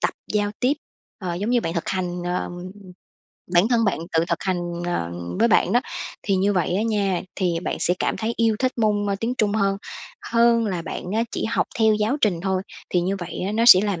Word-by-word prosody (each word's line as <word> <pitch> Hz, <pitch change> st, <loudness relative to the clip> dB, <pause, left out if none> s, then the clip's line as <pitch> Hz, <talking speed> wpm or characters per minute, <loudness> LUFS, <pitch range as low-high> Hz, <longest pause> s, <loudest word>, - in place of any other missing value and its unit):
tập -, -, +2 dB, 0.2 s
giao 205 Hz, -1 st, +1 dB
tiếp, 255 Hz, +3 st, +3 dB, 0.5 s
ờ, 180 Hz, -4 st, -3 dB
giống 205 Hz, +6 st, -2 dB
như 245 Hz, -1 st, +3 dB
bạn 165 Hz, -, -3 dB
thực 170 Hz, -, -2 dB
hành, 180 Hz, -2 st, -2 dB
ờ 180 Hz, +1 st, -2 dB, 1.0 s
bản 175 Hz, +6 st, +5 dB
thân 235 Hz, -2 st, +3 dB
bạn 200 Hz, -, +1 dB
tự 165 Hz, 0 st, +3 dB
thực 170 Hz, -, -1 dB
hành, 185 Hz, -2 st, 0 dB, 0.3 s
ờ, 85 Hz, -, -2 dB, 0.3 s
với 230 Hz, +2 st, +4 dB
bạn 190 Hz, -1 st, +3 dB
đó, 245 Hz, -, +4 dB, 0.4 s
thì 200 Hz, -, +1 dB
như 200 Hz, +2 st, +2 dB
vậy 180 Hz, -1 st, +1 dB
á 210 Hz, -, +1 dB
nha, 200 Hz, -5 st, 0 dB
thì 175 Hz, -4 st, 0 dB
bạn -, -, -1 dB
sẽ 180 Hz, -, +2 dB
cảm -, -, 0 dB
thấy 225 Hz, +1 st, -2 dB
yêu 225 Hz, -2 st, +2 dB
thích 255 Hz, 0 st, +1 dB
môn, 210 Hz, -2 st, +2 dB
ơ, 200 Hz, -, 0 dB
tiếng 240 Hz, +2 st, -1 dB
Trung 210 Hz, -2 st, +2 dB
hơn, 195 Hz, -2 st, +1 dB, 0.6 s
hơn 230 Hz, -1 st, +4 dB
là 180 Hz, -5 st, -2 dB
bạn -, -, -6 dB
á 225 Hz, -, +2 dB
chỉ -, -, -2 dB
học 230 Hz, -, +1 dB
theo 220 Hz, -1 st, +5 dB
giáo 215 Hz, +6 st, +1 dB
trình 185 Hz, -6 st, +2 dB
thôi, 190 Hz, -1 st, 0 dB, 0.3 s
thì 180 Hz, -, +2 dB
như 190 Hz, +3 st, -1 dB
vậy 175 Hz, -3 st, -6 dB
á 200 Hz, -, -2 dB
nó 225 Hz, +2 st, +2 dB
sẽ 185 Hz, -6 st, +10 dB
làm 200 Hz, -5 st, -1 dB
200 Hz, 230 wpm, -23 LUFS, 180-225 Hz, 1.0 s, sẽ